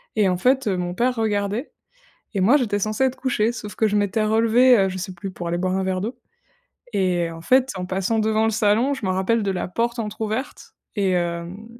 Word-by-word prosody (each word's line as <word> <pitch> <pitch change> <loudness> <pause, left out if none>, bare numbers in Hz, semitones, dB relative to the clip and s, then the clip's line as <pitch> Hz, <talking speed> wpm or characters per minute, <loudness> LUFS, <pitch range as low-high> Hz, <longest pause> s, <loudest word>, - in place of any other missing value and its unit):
et 205 -3 +3
en 180 - 0
fait, 260 +3 +2
heu, 190 -2 +1
mon 175 0 -3
père 250 +5 +1
regardait 210 +2 -1 0.6
et 195 - 0
moi, 235 +10 +5
j'étais 215 -7 0
censée 215 +5 0
être 260 0 0
couchée. 235 -4 0
Sauf 210 -4 -8
que 220 - +1
je 210 - 0
m'étais 205 +1 +1
relevée, 230 +3 +5
heu, 195 0 +3
je 185 0 -5
sais 190 +1 -5
plus, 190 +3 -6
pour 175 -1 -5
aller 175 - -1
boire 185 +1 0
un 190 - -1
verre 185 -1 -1
d'eau 225 +6 -4 0.7
et 180 -4 0
en 165 0 -9
fait, 260 +7 +3
en 180 - -4
passant 190 +4 -1
devant 220 0 +1
le 225 - +2
salon, 220 +6 +2
je 260 -6 -5
me 190 - +1
rappelle 205 +4 +1
de 195 - 0
la 180 - -3
porte 235 +4 -1
entrouverte 220 +3 -4 0.2
et 195 -2 +2
hem, 175 +3 -3
210 Hz, 230 wpm, -22 LUFS, 185-230 Hz, 0.7 s, moi